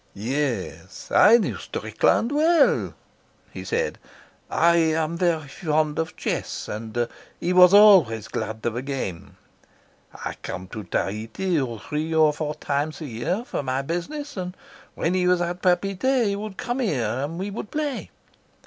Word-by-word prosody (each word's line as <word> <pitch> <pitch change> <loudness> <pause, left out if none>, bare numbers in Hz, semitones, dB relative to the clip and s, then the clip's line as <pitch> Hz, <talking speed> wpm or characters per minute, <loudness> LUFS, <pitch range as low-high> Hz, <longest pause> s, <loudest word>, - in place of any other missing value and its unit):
"Yes; 120 0 -3
I 225 +3 +7
knew 230 - -2
Strickland 235 - 0
well," 315 +1 +3 0.6
he - - -7
said. 475 +1 -2 0.5
"I 170 0 +4
am 160 0 +1
very 170 -4 0
fond 155 -1 -1
of 160 0 -3
chess, - - -3
and 115 +2 -3 0.3
he 175 +2 0
was 180 0 +8
always 185 - +6
glad 110 0 -5
of 120 -1 -1
a 120 - -2
game. 130 -11 -5 0.7
I - - -6
come 90 +1 -6
to 105 -1 -7
Tahiti 115 - -1
three 155 +10 -3
or 155 -1 +5
four 150 0 -3
times 145 +2 -2
a - - -4
year 140 - -2
for - - -3
my 130 0 -2
business, 250 - -4
and 180 0 -5 0.4
when 170 - 0
he 180 -1 +1
was 180 -1 +4
at 175 +1 -3
Papeete 195 +7 +2
he 200 -1 0
would 205 -1 -6
come 245 +2 -3
here 155 - 0
and 135 +9 -3
we 195 +3 -4
would 210 0 -6
play. 295 -3 -3
165 Hz, 155 wpm, -24 LUFS, 135-195 Hz, 0.7 s, was